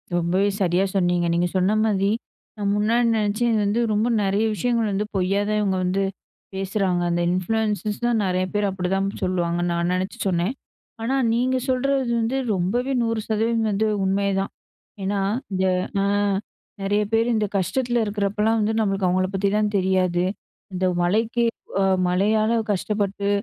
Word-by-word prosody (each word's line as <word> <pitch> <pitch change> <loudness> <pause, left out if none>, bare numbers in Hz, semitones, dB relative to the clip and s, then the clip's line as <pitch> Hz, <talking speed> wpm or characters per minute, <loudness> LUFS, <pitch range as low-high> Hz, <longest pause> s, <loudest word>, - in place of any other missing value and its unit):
ரொம்பவே 180 +4 +1
சரியா 180 0 +2
சொன்னீங்க. 175 -2 +2
நீங்க 175 +1 +2
சொன்ன 190 +4 +2
மாதிரி, 200 -2 +1 0.5
நான் 200 -1 0
முன்னாடி 230 +3 +2
நினைச்சேன் 215 +3 +1
இது 220 - +2
வந்து 210 +4 +1
ரொம்ப 215 +3 +1 0.2
நிறைய 200 +3 +1
விஷயங்கள் 230 +2 0
வந்து 200 +2 -1
பொய்யா 190 +2 +1
தான் 210 0 +1
இவங்க 190 -2 0
வந்து, 195 +2 0 0.5
பேசுறாங்க. 190 -2 0
அந்த 170 0 0
இன்ஃப்ளூயன்ர்ஸ்லாம் 215 +4 0
நிறைய 185 0 0
பேர் 205 0 +1
அப்படிதான் 195 +1 -1 0.2
சொல்லுவாங்கன்னு 175 -1 0
நான் 170 +1 0
நினைச்சு 185 +1 -2
சொன்னேன். 180 +6 0 0.5
ஆனா, 260 +4 0 0.2
நீங்க 255 +2 +1
சொல்றது 260 -1 +1
வந்து 235 +4 0 0.2
ரொம்பவே 235 +9 -1
100% 225 0 0
வந்து 215 +2 +1 0.2
உண்மைதான். 195 0 0 0.5
ஏன்னா 200 +1 0 0.3
இந்த, 190 0 +1 0.4
ஆ - - +1 0.8
நிறைய 205 +2 +1
பேர் 225 +1 +2
இந்த 215 -2 +1
கஷ்டத்தில 240 +5 0
இருக்கிறப்போலாம் 210 +2 0
வந்து 215 +1 +1
நம்மளுக்கு 195 -3 +1
அவங்களை 185 +1 +1
பத்திலாம் 205 +2 +1
தெரியாது. 185 -2 +2 0.5
இந்த 185 +1 -1 0.2
மழைக்கு, 225 +6 +1 0.6
மழையால 215 +5 +2 0.2
கஷ்டப்பட்டு 200 0 -1
200 Hz, 140 wpm, -23 LUFS, 185-220 Hz, 0.8 s, சரியா